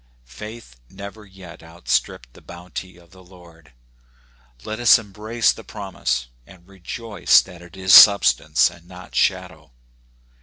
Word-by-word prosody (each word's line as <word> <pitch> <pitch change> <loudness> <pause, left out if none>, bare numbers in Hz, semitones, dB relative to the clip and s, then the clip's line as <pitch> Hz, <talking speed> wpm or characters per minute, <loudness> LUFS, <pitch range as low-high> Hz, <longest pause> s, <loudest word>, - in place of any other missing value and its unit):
Faith 105 - -12
never 100 +2 -11
yet 95 -3 -14
outstripped 60 -6 -4
the - - -18
bounty 90 +1 -10
of 85 -1 -22
the 95 0 -18
Lord. 85 -5 -19 0.9
Let 110 +1 -6
us 120 -2 +6
embrace 110 +2 -2
the 115 - -13
prom 100 -4 -10
ise, - - -2 0.2
and 90 -1 -19
rejoice 100 +3 0
that 90 -2 -15
it 85 0 -16
is 95 0 +1
substance 85 -6 +6
and 85 0 -19
not 90 0 -14
shadow. - - -2
95 Hz, 140 wpm, -20 LUFS, 85-100 Hz, 0.9 s, us